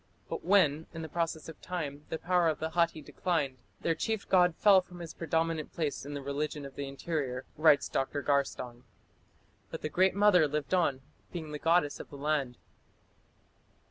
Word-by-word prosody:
But - - -4
when, 160 -5 +3
in 165 - -5
the 160 - -6
process 165 -1 -2
of 160 - -10
time, 150 -5 -5
the - - -2
power 175 0 +2
of 155 - +1
the 160 +1 -3
Hatti 170 -2 +1
declined, 145 -6 -1 0.2
their 165 - +2
chief 220 +5 -2
god 180 -3 +4
"fell... 200 -3 +6
from 180 -1 -14
his 165 -2 -7
predominant 165 -1 -1
place 150 -4 -2
in 145 - -5
the 140 - -5
religion 145 +1 -3
of 135 - -9
the 140 - -4
interior", 135 -2 -3
writes 155 -2 +5
Dr. 140 +2 -2
Garstang. 130 -4 -1 0.9
"But - - -7
the 155 - -1
Great 185 +3 +3
Mother 200 -6 +5
lived 150 +3 -3
on, 145 -8 +2 0.3
being 160 -3 -6
the 150 - -5
goddess 165 -2 +2
of - - -9
the 140 - -10
land." 140 -4 -1
155 Hz, 180 wpm, -31 LUFS, 145-175 Hz, 0.9 s, fell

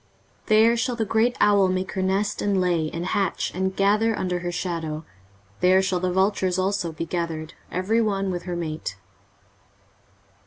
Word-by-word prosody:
23:034:015 - - -32
There 220 +2 +5
shall 240 +1 -1
the 225 -1 -1
great 225 +4 +1
owl 200 -2 +5
make 185 0 -1
her 190 - -2
nest, 195 +2 0
and 200 -2 +1
lay, 170 -4 +1
and 170 +2 -4
hatch, 195 +1 -1
and 190 +1 -1
gather 210 +3 +2
under 180 -1 -1
her 175 0 -3
shadow: 165 -3 -3 0.5
there 185 +1 +4
shall 185 -1 0
the 180 0 -1
vultures 190 -1 +1
also 185 -2 0
be 160 +1 -5
gathered, 165 -2 -4 0.2
every 200 +6 +1
one 195 -3 0
with 175 -1 -4
her 175 - -2
mate. 155 - -4
185 Hz, 170 wpm, -24 LUFS, 175-205 Hz, 0.5 s, There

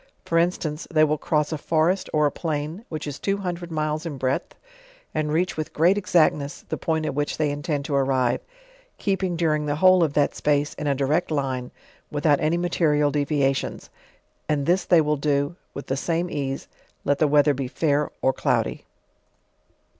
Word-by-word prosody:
For 165 - +2
instance, 165 -3 -1
they 155 -3 +4
will 155 -1 +2
cross 150 +1 0
a 155 - -3
forest, 165 +5 +1
or 150 -1 +3
a 145 - +2
plain, 160 +5 -4
which 155 -1 -5
is 145 -2 -6
two 195 0 0
hundred 175 -3 -5
miles 155 0 -1
in 160 -5 -5
breadth, 130 +1 -2 0.6
ar.d 155 -1 0
reach 165 +3 0
with 155 -1 -4
great 170 +5 +4
exactness 155 -7 +1
the - - -1
point 160 -1 -1
at - - -2
which 145 +1 -2
they 150 -2 +1
intend 145 -1 -2
to 150 - -3
arrive, 130 -3 +1 0.6
keeping 190 -3 -1
during 155 -3 0
the 145 - 0
whole 185 +3 +5
of 150 -3 0
thai 145 -1 +3
space 145 0 0
in 150 - -5
a 140 - +2
direct 145 +6 0
line, 130 -4 -2 0.4
with 145 +1 -4
out 145 -2 +5
any 155 +3 +1
material 155 -4 +2
deviations; 140 -2 -1 0.6
and 145 -2 +1
this 180 +4 +2
they 175 -3 +5
will 150 0 0
do 145 +2 0 0.2
with 140 - -6
the 135 - -1
same 170 +4 -1
ease, 135 -1 -3 0.4
let 145 0 +1
the 155 - +4
weather 145 0 +4
be 135 -1 -3
fair 150 +2 0
or 130 - +3
cloudy. - - -1
150 Hz, 185 wpm, -24 LUFS, 145-165 Hz, 0.6 s, whole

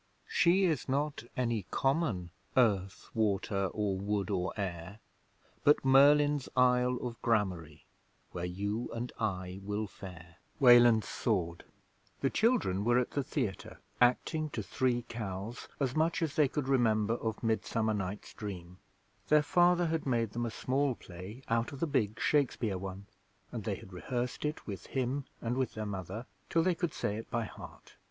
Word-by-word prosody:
She 180 +3 +4
is 160 -7 +1
not 140 -1 -1
any 115 -7 0
common 135 - 0 0.3
Earth, 100 -6 +2
Water 100 -2 +1
or 100 -1 -1
Wood 105 +1 -1
or 90 -2 0
Air, 90 -1 -4 0.7
But 145 -1 +4
Merlin's 145 +1 +5
Isle 125 0 +4
of 120 -2 -6
Gramarye, 95 -9 0 0.5
Where 85 - -5
you 100 +6 -3
and 120 +1 -4
I 95 -4 -2
will 105 +2 -2
fare. 90 -4 -11 0.2
The 115 - +4 0.7
children 220 - +2
were 120 +2 +3
at 125 - +1
the 140 - 0
Theatre, 125 - -3 0.2
acting 155 +5 +2
to 110 -6 -4
Three 120 +4 0
Cows 110 0 -6
as 130 -3 0
much 160 +2 +1
as 155 -3 -2
they 150 -2 +5
could 135 0 -3
remember 115 -5 +3
of 115 -1 -3
Midsummer 110 0 0
Night's 100 0 -4
Dream. 90 -4 -7 0.5
Their 150 0 +5
father 175 +3 +4
had 160 -3 -1
made 115 -4 +1
them 120 +1 -2
a - - -2
small 130 +3 0
play 95 +9 -10
out 115 0 0
of 140 - -8
the 165 - +1
big 125 -9 0
Shakespeare 120 -9 +1
one, 95 +1 -6 0.5
and 115 -4 -5
they 105 - -1
had 95 - -12
rehearsed 125 +9 -3
it 150 +1 -3
with 100 -3 -7
him 135 +1 -1 0.2
and 120 +1 -1
with 130 -1 -1
their 110 -1 -3
mother 100 +3 -5 0.2
till 165 - +3
they 185 +1 +3
could 170 -2 -2
say 105 - -1
it 115 - -7
by 115 0 -1
heart. - - -12
115 Hz, 160 wpm, -32 LUFS, 100-135 Hz, 0.7 s, Merlin's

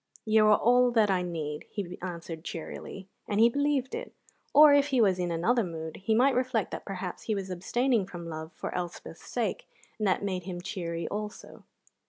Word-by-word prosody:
"You 215 -1 +5
are 210 - +6
all 245 +1 +4
I 195 -4 +3
need," 155 -4 -4
he 185 -4 -5
answered 170 -2 -6
cheerily, 180 +3 -7 0.2
and 205 - 0
he 230 +1 +7
believed 285 0 0
it. 485 +2 -6 0.4
Or, 295 0 +8
if 285 0 +4
he 265 -3 +1
was 195 -5 +4
in 175 -1 -1
another 200 +9 +2
mood, 160 -3 -6
he 220 +3 0
might 260 +4 +4
reflect 250 -4 0
that - - -6
perhaps 185 -2 -5
he 215 - 0
was 190 -1 -4
abstaining 225 +4 +1
from 170 -2 -8
love 160 0 -6
for - - -6
Elspeth's 175 -1 -6
sake, - - -2 0.3
and 215 - +1
that 190 - +1
made 185 -3 -2
him 180 -2 -5
cheery 170 -3 -4
also. 210 0 -7
195 Hz, 190 wpm, -29 LUFS, 175-240 Hz, 0.4 s, Or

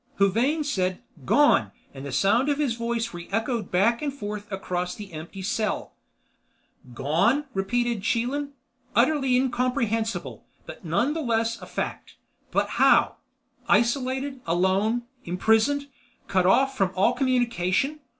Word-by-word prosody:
Huvane 235 +11 +2
said, 185 -10 -1 0.2
"Gone!" 290 - +4 0.2
and 135 -1 -9
the 140 - -6
sound 205 - +2
of 285 - +1
his 290 -5 0
voice 235 -1 -2
re 175 0 -8
echoed 225 0 -1
back 210 +6 +2
and 295 -2 -1
forth 210 -5 -7
across 180 -2 -3
the 205 -4 -10
empty 170 +5 -8
cell. 215 +3 -2 1.0
"Gone," 170 - +2
repeated 235 +3 0
Chelan. 260 +7 -1 0.4
"Utterly 270 -5 +3
incomprehensible, 240 -3 -1 0.2
but - - -10
none 210 - +1
the 325 - -3
less 230 -3 0
a - - -9
fact. - - -5 0.3
But - - -1
how—? - - +5 0.5
Isolated, 260 +2 +1
alone, 190 +7 +1 0.2
imprisoned—cut 225 0 0
off 270 +7 +3
from 195 -2 +1
all 195 +6 +3
communication. 250 +1 0
230 Hz, 125 wpm, -25 LUFS, 195-260 Hz, 1.0 s, how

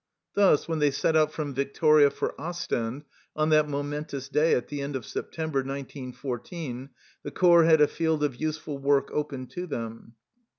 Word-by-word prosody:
Thus 195 -7 +4
when 165 -1 -1
they 150 -1 +4
set 150 +3 0
out 155 -1 +4
from 150 -3 -4
Victoria 145 +2 +4
for - - -3
Ostend 150 -7 -3 0.3
on 155 0 +1
that 155 -1 +4
momentous 145 -1 -4
day 150 +3 +3
at 125 - -2
the 145 -1 -5
end 140 0 -4
of 130 - -4
September, 160 -4 -3
1914, 135 +1 -6 0.3
the - - -6
corps 170 -2 +5
had 160 -2 +5
a 150 - +7
field 160 -2 -1
of 145 -4 0
useful 155 -2 -3
work 140 0 +2
open 140 -3 -3
to 180 0 -6
them. 115 -4 -6
145 Hz, 170 wpm, -27 LUFS, 135-155 Hz, 0.3 s, a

